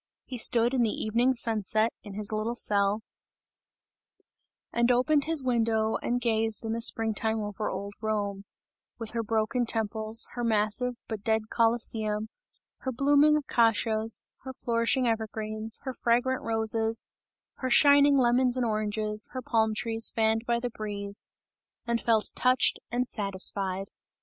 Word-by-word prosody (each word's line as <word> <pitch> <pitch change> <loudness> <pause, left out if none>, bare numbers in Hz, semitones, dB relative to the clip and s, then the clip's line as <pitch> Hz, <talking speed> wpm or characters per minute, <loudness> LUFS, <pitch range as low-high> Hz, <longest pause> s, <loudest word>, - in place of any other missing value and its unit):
He 250 -2 -7
stood 235 +1 +3
in 255 - +2
the 230 - +2
evening 235 +5 +1
sunset, 220 -1 0
in 205 -2 -10
his 210 0 -2
little 215 +2 -2
cell, 205 -1 +1 1.7
and 235 +1 +2
opened 280 +4 +2
his 320 -3 0
window 225 -3 +1
and 245 +1 -2
gazed 225 -2 0
in 220 - -2
the 230 - -3
spring 225 -1 +3
time 220 +1 -1
over 210 0 -4
old 200 0 -5
Rome 205 -2 -2 0.5
with 225 -2 -6
her 235 - -2
broken 225 +2 -1
temples, 220 0 +2
her 240 - -5
massive, 225 +2 +1
but 220 -3 -5
dead 220 0 -1
Colosseum; 220 -2 +1 0.5
her 260 - -3
blooming 285 +4 +4
acacias, 225 -4 +1 0.2
her 260 0 -8
flourishing 235 +2 0
evergreens, 220 -1 -2
her 260 - -4
fragrant 245 +2 0
roses, 225 0 0 0.5
her 260 - -3
shining 285 +1 +5
lemons 250 0 +3
and 250 - 0
oranges, 215 -1 -1
her 255 - -4
palm 220 -2 +1
trees 225 +1 0
fanned 225 0 0
by 235 0 +1
the 245 0 -4
breeze 200 -2 -4 0.6
and 235 -1 -1
felt 225 -2 +2
touched 255 0 +2
and 245 +1 -1
satisfied. 195 -2 -3
225 Hz, 145 wpm, -28 LUFS, 215-245 Hz, 1.7 s, shining